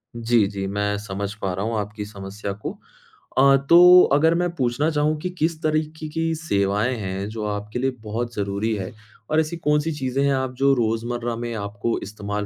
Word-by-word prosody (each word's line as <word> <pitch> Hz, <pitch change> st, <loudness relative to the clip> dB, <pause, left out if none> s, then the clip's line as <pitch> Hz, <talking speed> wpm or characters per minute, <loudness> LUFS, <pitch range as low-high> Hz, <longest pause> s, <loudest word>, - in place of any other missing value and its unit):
जी, 115 Hz, -2 st, +2 dB
जी 100 Hz, -1 st, -4 dB
मैं 105 Hz, +1 st, -1 dB
समझ 100 Hz, 0 st, -4 dB
पा 95 Hz, -2 st, -1 dB
रहा 95 Hz, +4 st, -3 dB
हूँ 115 Hz, -1 st, -1 dB
आपकी 105 Hz, 0 st, -5 dB
समस्या 100 Hz, 0 st, -6 dB
को। -, -, -2 dB, 0.7 s
अ, 135 Hz, +1 st, +6 dB
तो 180 Hz, +1 st, +9 dB
अगर 160 Hz, +3 st, +4 dB
मैं 175 Hz, 0 st, +1 dB
पूछना 130 Hz, +2 st, +1 dB
चाहूँ 150 Hz, +1 st, +1 dB
कि 180 Hz, -, -2 dB
किस 160 Hz, 0 st, 0 dB
तरीके 155 Hz, 0 st, -1 dB
की 165 Hz, +1 st, -1 dB
सेवाएँ 105 Hz, -4 st, 0 dB
हैं, 95 Hz, 0 st, -4 dB
जो 110 Hz, 0 st, -5 dB
आपके 105 Hz, +3 st, -4 dB
लिए 135 Hz, +1 st, +1 dB
बहुत 115 Hz, +3 st, -3 dB
ज़रूरी 100 Hz, +2 st, -1 dB
है? 95 Hz, -2 st, -5 dB, 0.4 s
और 155 Hz, -, +3 dB
ऐसी 160 Hz, +2 st, -1 dB
कौन-सी 150 Hz, 0 st, +1 dB
चीज़ें 135 Hz, -1 st, -1 dB
हैं 140 Hz, -, +3 dB
आप 130 Hz, -1 st, -1 dB
जो 140 Hz, 0 st, +4 dB
रोज़मर्रा 120 Hz, +1 st, -1 dB
में 120 Hz, 0 st, -4 dB
आपको 100 Hz, +2 st, -2 dB
इस्तेमाल 105 Hz, 0 st, -4 dB
120 Hz, 190 wpm, -23 LUFS, 105-150 Hz, 0.7 s, तो